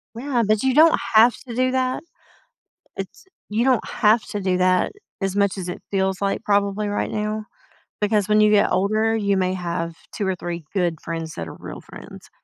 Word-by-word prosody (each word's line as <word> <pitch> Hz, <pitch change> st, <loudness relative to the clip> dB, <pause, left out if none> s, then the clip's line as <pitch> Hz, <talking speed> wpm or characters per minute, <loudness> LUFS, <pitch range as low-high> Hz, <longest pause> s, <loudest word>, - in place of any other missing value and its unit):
Yeah, 245 Hz, 0 st, 0 dB
but 215 Hz, -1 st, +2 dB
you 265 Hz, -1 st, +2 dB
don't 320 Hz, +3 st, +6 dB
have 225 Hz, +2 st, +6 dB
to 235 Hz, -, -6 dB
do 255 Hz, +1 st, +2 dB
that. 255 Hz, +2 st, -1 dB, 0.9 s
It's -, -, -8 dB, 0.2 s
you 225 Hz, +4 st, 0 dB
don't 255 Hz, -4 st, +2 dB
have 215 Hz, +1 st, +3 dB
to 205 Hz, -, -4 dB
do 185 Hz, -1 st, +1 dB
that 185 Hz, 0 st, +2 dB, 0.3 s
as 195 Hz, 0 st, -1 dB
much 200 Hz, -1 st, +1 dB
as 180 Hz, -1 st, -4 dB
it 175 Hz, -, -6 dB
feels 190 Hz, -1 st, 0 dB
like 195 Hz, 0 st, -1 dB
probably 200 Hz, 0 st, +1 dB
right 205 Hz, -, -2 dB
now, 215 Hz, 0 st, -2 dB, 0.6 s
because 210 Hz, -1 st, +2 dB
when 215 Hz, 0 st, +4 dB
you 210 Hz, 0 st, +5 dB
get 205 Hz, -1 st, +4 dB
older, 215 Hz, +4 st, +1 dB
you 200 Hz, -3 st, +1 dB
may 185 Hz, 0 st, +1 dB
have 170 Hz, -2 st, -3 dB, 0.2 s
2 200 Hz, -, -2 dB
or 190 Hz, -, 0 dB
3 175 Hz, -2 st, -6 dB
good 175 Hz, -5 st, 0 dB
friends 165 Hz, -1 st, -5 dB
that 80 Hz, -1 st, -5 dB
are -, -, -9 dB
real -, -, -8 dB
friends. -, -, -12 dB
205 Hz, 200 wpm, -22 LUFS, 185-220 Hz, 0.9 s, don't